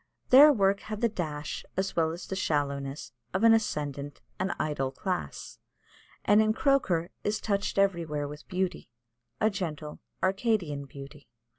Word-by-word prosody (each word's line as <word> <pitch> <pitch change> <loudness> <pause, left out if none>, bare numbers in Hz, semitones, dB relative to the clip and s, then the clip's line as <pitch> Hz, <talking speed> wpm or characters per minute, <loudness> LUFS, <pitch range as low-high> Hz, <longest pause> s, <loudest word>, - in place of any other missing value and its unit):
Their 285 +4 +10
work 200 -5 +2
had 215 0 -6
the 235 - +4
dash 155 -7 -4
as 190 0 -1
well 160 -1 +2
as 170 +2 -6
the 190 - -4
shallowness 140 -5 -2 0.2
of 190 - +1
an 230 0 +8
ascendant 145 -10 -1 0.2
and 190 +1 0
idle 145 -3 -1
class, 180 +6 -4 0.7
and 205 +1 +6
in 215 0 +3
Croker 215 - +1
is 210 +1 0
touched 200 -2 -1
everywhere 170 -7 +1
with 150 +1 -10
beauty 185 -6 -2 0.5
a 215 0 +3
gentle 155 -6 -5 0.2
Arcadian 190 -8 0
beauty. 140 +1 -11
180 Hz, 145 wpm, -29 LUFS, 150-205 Hz, 0.7 s, Their